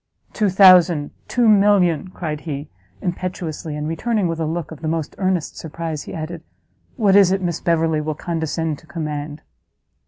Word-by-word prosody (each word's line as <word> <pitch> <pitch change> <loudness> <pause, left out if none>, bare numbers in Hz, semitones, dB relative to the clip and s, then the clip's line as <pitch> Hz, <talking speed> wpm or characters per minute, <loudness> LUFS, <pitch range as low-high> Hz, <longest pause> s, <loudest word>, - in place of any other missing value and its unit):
"Two 210 -3 +1
thousand! 180 -5 +6 0.2
two 240 -2 +2
million!" 195 -6 +4
cried 160 -5 -5
he, 145 -2 -6 0.3
impetuously, 175 -4 -4
and 150 0 -3
returning, 200 +5 0
with 165 -1 -3
a 160 - -1
look 165 0 -4
of 160 - -10
the 160 - -3
most 160 -1 -2
earnest 185 -4 -1
surprise, 160 -1 -5
he - - -9
added, 165 +1 -5 0.5
"What 205 -6 +3
is 195 -2 +6
it 195 - +1
Miss 170 -2 -1
Beverley 160 -2 +1
will 155 0 -3
condescend 160 -2 -3
to 160 - -21
command?" 150 -1 -5
165 Hz, 165 wpm, -20 LUFS, 155-185 Hz, 0.5 s, thousand